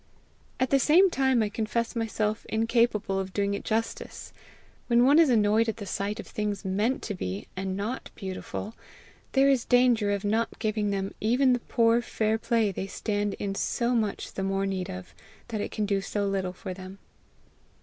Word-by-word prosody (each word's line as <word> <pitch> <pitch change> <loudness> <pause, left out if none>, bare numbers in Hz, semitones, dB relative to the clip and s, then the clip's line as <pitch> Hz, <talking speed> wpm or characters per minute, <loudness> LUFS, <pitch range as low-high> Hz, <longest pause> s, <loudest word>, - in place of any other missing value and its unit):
At 255 0 +1
the 275 - +5
same 350 +7 +5
time 265 -5 +2
I 210 - -1
confess 230 +3 -2
myself 220 -1 -1
incapable 225 -3 +1
of 190 -1 -4
doing 200 0 0
it 200 - -4
justice. 225 +1 -3 0.5
When 240 0 +4
one 285 +4 +6
is 325 -4 +6
annoyed 220 -1 +3
at 225 - -3
the 205 - -6
sight 200 +3 -3
of - - -6
things 210 -1 -3
meant 210 +7 0
to 210 - -3
be 100 - -4
and 190 0 -3
not 220 +6 -4
beautiful, 195 +2 -6 0.6
there 270 0 +5
is 270 -4 +3
danger 245 -4 +3
of 200 0 -1
not 225 +3 0
giving 215 -2 -1
them 195 -1 -2
even 250 +4 +3
the 245 - +1
poor 230 0 +2
fair 220 -1 0
play 225 -3 +1
they 190 +1 -4
stand 205 0 -2
in 200 -1 -3
so 235 +4 0
much 215 -4 -1
the - - -4
more 195 0 0
need 190 -1 -2
of 185 -1 -8 0.4
that 215 -3 -2
it - - -3
can 210 - -2
do 200 -1 0
so 205 +1 -2
little 190 -2 -1
for 185 0 -6
them. 185 +1 -10
215 Hz, 190 wpm, -27 LUFS, 195-235 Hz, 0.6 s, one